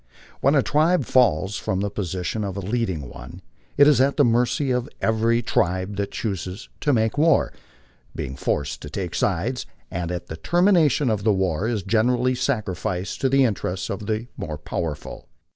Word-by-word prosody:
When 140 +3 +3
a 135 - +4
tribe 155 0 +2
falls 100 -7 +2
from 95 +1 -2
the 100 0 -2
position 95 +1 -3
of 100 -1 -4
a - - -2
leading 95 - -2
one, - - -11 0.3
it 145 0 +7
is 145 -4 +5
at 140 +1 +2
the 145 - +5
mercy 125 +4 +2
of 125 +2 -1
every 115 +1 +2
tribe 95 0 0
that 100 0 -1
chooses 95 -2 -4
to 145 - +1
make 110 +1 +1
war, 160 -1 +3 0.6
being 65 - -4
forced 70 +1 -2
to 75 - -7
take 90 +2 -4
sides, - - -1 0.2
and 85 0 -3
at 90 -1 -4
the 80 - -7
termination 170 - +3
of 105 -2 -1
the 110 - +4
war 95 -1 0
is 110 -5 -1
generally 120 +5 +2
sacrificed 100 - -2
to 135 - +2
the 135 +1 +4
interests 95 -5 -2
of 100 +1 -5
the 110 +1 -1
more 75 -1 -4
powerful. 75 0 -5
110 Hz, 175 wpm, -23 LUFS, 95-125 Hz, 0.6 s, it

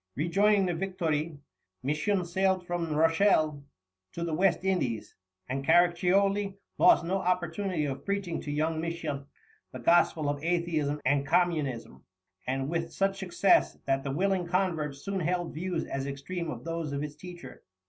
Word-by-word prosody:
Rejoining 195 +7 +3
the 175 - 0
Victoire, 165 -4 -2 0.5
Misson 160 +7 0
sailed 190 +1 +1
from 175 -2 -2
Rochelle 155 -2 +3 0.5
to 170 - -4
the 165 -2 -2
West 185 +1 +2
Indies, 125 - -1 0.3
and 135 +2 -3
Caraccioli 185 +5 +3 0.2
lost 175 - +6
no 185 +3 0
opportunity 180 -2 -1
of 135 -1 -4
preaching 200 -4 -2
to 145 - -5
young 155 +2 0
Misson 160 -4 -4 0.4
the - - -7
gospel 160 +3 +3
of 145 0 -2
atheism 165 -4 0
and 140 +1 +2
communism, 145 - 0 0.4
and 135 +1 -1
with 165 +1 -2
such 195 0 0
success 190 +1 +3
that 135 0 +1
the 140 - -3
willing 185 +4 0
convert 170 -6 0
soon 195 +8 -4
held 175 0 -1
views 170 +1 -2
as 135 0 -4
extreme 160 +5 -4
as - - -6
those 165 -3 -3
of 140 +1 -2
his 150 0 -6
teacher. 175 +2 -10
170 Hz, 150 wpm, -29 LUFS, 150-185 Hz, 0.5 s, lost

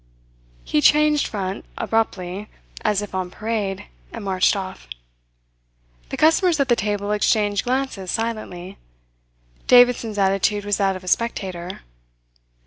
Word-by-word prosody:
He 150 - +1
changed 300 - +4
front 195 -2 -4
abruptly, 200 -3 -2 0.3
as 210 -1 +1
if 205 - -9
on 185 -1 -2
parade, 210 -1 -3 0.3
and - - -7
marched 190 0 +2
off. 185 - -6 1.2
The - - -4
customers 325 +1 +3
at 275 -1 +1
the 240 - +5
table 205 -1 -2
exchanged 205 -1 +1
glances 250 -7 -2
silently. 215 -5 -4 0.9
Davidson's 245 -3 +5
attitude 200 +1 +1
was 205 -1 0
that 195 -2 +1
of 185 - -8
a - - -12
spectator. 185 -5 -2
205 Hz, 125 wpm, -22 LUFS, 190-230 Hz, 1.2 s, the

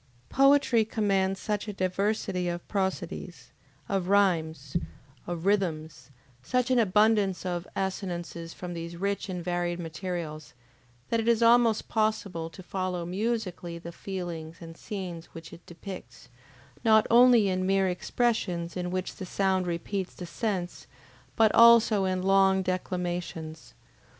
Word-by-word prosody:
Poetry 275 -4 +4
commands 195 -3 0
such 210 0 -2
a 210 - -4
diversity 185 -1 -1
of 175 0 -5
prosodies, 190 -2 -4 0.4
of 195 -3 -1
rhymes, 160 -8 +1 0.5
of 175 0 -4
rhythms, 160 -8 -1 0.3
such 250 - 0
an 255 - +4
abundance 210 -2 +3
of 175 -1 -3
assonances 175 -3 -4
from 180 0 -7
these 170 0 -6
rich 200 +2 -2
and 180 -2 -4
varied 175 -1 -1
materials, 165 -3 -6 0.6
that 230 - +2
it 225 - -2
is 235 0 +3
almost 230 -1 +4
possible 210 -7 -1
to 185 +3 -12
follow 185 -2 -3
MUSICALLY 185 -3 -3
the 170 0 -8
feelings 170 -3 -6
and 165 -1 -10
scenes 175 -4 -6
which 165 0 -10
it 170 - -12
depicts, 170 - -10 0.5
not 220 -1 +5
only 240 -3 +7
in 185 -1 0
mere 195 0 +2
expressions 180 -3 -1
in 180 -1 -3
which 185 0 -4
the 190 - -6
sound 190 -1 0
repeats 180 +3 -3
the 180 - -7
sense, 185 -1 -3 0.5
but 220 -1 +4
also 230 -3 +6
in 185 -1 -1
long 195 0 +4
declamations. 175 - -4
185 Hz, 135 wpm, -28 LUFS, 175-205 Hz, 0.6 s, only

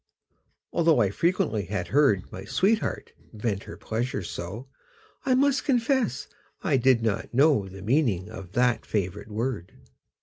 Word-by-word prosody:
Although 165 -5 +4
I 100 -5 +3
frequently 110 - 0
had 90 -2 -3
heard 135 -10 +3
My 95 - -7
sweetheart 205 - 0 0.2
vent 105 -2 -3
her - - -9
pleasure 115 -2 -3
so, 100 +10 -6 0.6
I 255 - +4
must 275 +1 +2
confess 260 -1 +1 0.4
I 155 -7 +2
did 125 -2 +3
not 110 +1 -2
know 135 -8 +4
The 95 0 -10
meaning 110 - +1
of 95 -4 -10
that 125 0 +2
favorite 100 +1 -3
word. 110 -4 -3
115 Hz, 140 wpm, -26 LUFS, 100-150 Hz, 0.6 s, Although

